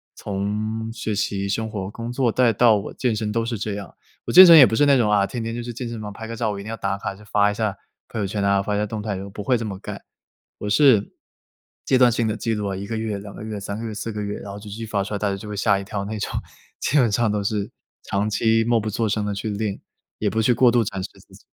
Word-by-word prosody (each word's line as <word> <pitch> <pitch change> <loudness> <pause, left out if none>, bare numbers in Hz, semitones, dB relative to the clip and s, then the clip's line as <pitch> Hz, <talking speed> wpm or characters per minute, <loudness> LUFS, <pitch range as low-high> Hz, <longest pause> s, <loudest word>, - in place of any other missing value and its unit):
从 105 +3 -3
学 110 -1 -3
习、 100 -1 -1
生 110 +3 -2
活、 95 -3 -4
工 115 +2 -6
作 125 -1 +1
再 125 0 +3
到 115 +1 +5
我 100 - -4
健 120 -4 0
身 105 0 -2
都 115 +1 0
是 115 0 -2
这 105 0 -3
样。 100 -2 -8 0.3
我 - - -3
健 185 - +12
身 170 -2 +10
也 140 - +10
不 110 - 0
是 145 - +3
那 140 -1 +5
种 115 -4 +2
啊， 100 -1 +4
天 115 +4 -4
天 115 0 -3
就 120 - -4
去 120 - -5
健 120 +1 -5
身 115 -2 -6
房 105 -1 -6
拍 110 +2 -8
个 115 - -5
照， 115 -1 -1
我 100 - -5
一 - - -7
定 110 - -8
要 - - -3
打 100 -1 -2
卡 100 - -4
就 105 - -16
发 105 0 +4
一 - - -4
下， 105 -2 -2 0.3
朋 110 - -5
友 105 - 0
圈 100 +1 -2
啊、 100 0 +3
发 105 +1 -1
一 - - 0
下 105 - +1
动 110 +1 -5
态， 105 -1 -3
我 100 - -8
不 100 +1 -7
会 125 +4 +2
这 - - -3
么 100 -3 -5
干。 - - -8 0.6
我 - - -5
是， 115 -3 +4 0.7
阶 130 - +3
段 125 -1 +6
性 115 -1 0
地 110 - -1
记 115 +1 -1
录 105 -1 -2
啊， - - -3
1 100 +1 -6
个 115 - -3
月、 110 -2 -3
2 100 0 -10
个 - - -8
月、 110 -1 -5
3 100 +1 -5
个 115 - -5
月、 110 - -4
4 115 +2 -4
个 105 -1 -4
月， 105 0 -4
然 100 - -8
后 100 - -7
就 - - -14
继 100 - -7
续 115 - -5
发 100 -2 0
出 100 - -6
来 100 - -2
大 105 - 0
家 100 - -2
就 105 - -9
会 105 - -5
吓 100 0 +2
一 - - -6
跳 100 0 -4
那 110 +2 -4
种。 - - -3 0.5
基 150 - +1
本 120 -6 +4
上 110 +1 +2
都 105 -1 -1
是 100 0 -1 0.3
长 100 +2 -1
期 115 +1 +2
默 115 0 +2
不 110 0 -3
作 110 +2 -1
声 105 0 0
地 105 -1 -2
去 105 +2 -3
练， 105 -1 -3 0.4
也 105 - 0
不 110 - +1
去 115 - +3
过 125 0 +5
度 120 -1 +3
展 95 -2 -4
示 - - -3
自 - - -19
己。 - - -15
105 Hz, 325 characters per minute, -23 LUFS, 100-115 Hz, 0.7 s, 健